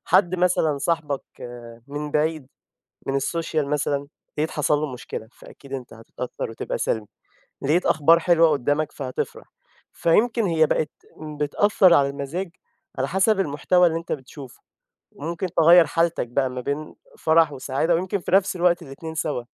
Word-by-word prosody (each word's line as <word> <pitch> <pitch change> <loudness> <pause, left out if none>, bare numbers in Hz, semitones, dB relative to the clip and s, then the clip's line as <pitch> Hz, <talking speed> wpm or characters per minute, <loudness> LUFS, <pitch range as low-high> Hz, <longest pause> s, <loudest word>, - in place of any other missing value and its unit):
حد 185 -2 +3
مثلًا 175 -5 +1
صاحبك 150 -3 -1 0.6
من 145 +1 -5
بعيد، 155 -2 0 0.6
من 135 - -1
السوشيال 155 0 -1
مثلًا، 145 -1 -1 0.3
لقيت 155 +2 0
حصل 150 -1 +1
له 150 -3 -3
مشكلة، 110 -2 -7
فأكيد 140 -1 -15
أنت 130 -3 -6
هتتأثَّر 115 +2 -6
وتبقى 115 - -4
سلبي. 110 -2 -1 0.6
لقيت 160 +6 +1
أخبار 160 +2 +5
حلوة 170 -1 +4
قُدَّامك، 145 +2 0
فهتفرح. 130 -3 -5 0.5
فيمكن 225 +7 +2
هي 165 -4 +3
بقت 150 0 0 0.5
بتأثَّر 185 +4 +4
على 140 -1 +4
المزاج، 140 +7 -4 0.5
على 130 - 0
حسب 195 +5 +2
المحتوى 180 +3 +2
اللي 165 -1 +1
أنت 165 - -6
بتشوفه. 135 -1 -8 0.5
وممكن 170 +5 -4
تغيّر 170 +1 +7
حالتك 165 -2 0
بقى، 130 +2 0
ما 125 0 -5
بين 145 +4 -4 0.2
فرح 160 -1 +4
وسعادة، 140 +5 0
ويمكن 185 +3 -1
في 175 - -6
نفس 195 0 +3
الوقت 175 -1 +2
ال2 160 +2 -8
سوا. 150 -5 -2
155 Hz, 145 wpm, -23 LUFS, 140-170 Hz, 0.6 s, تغيّر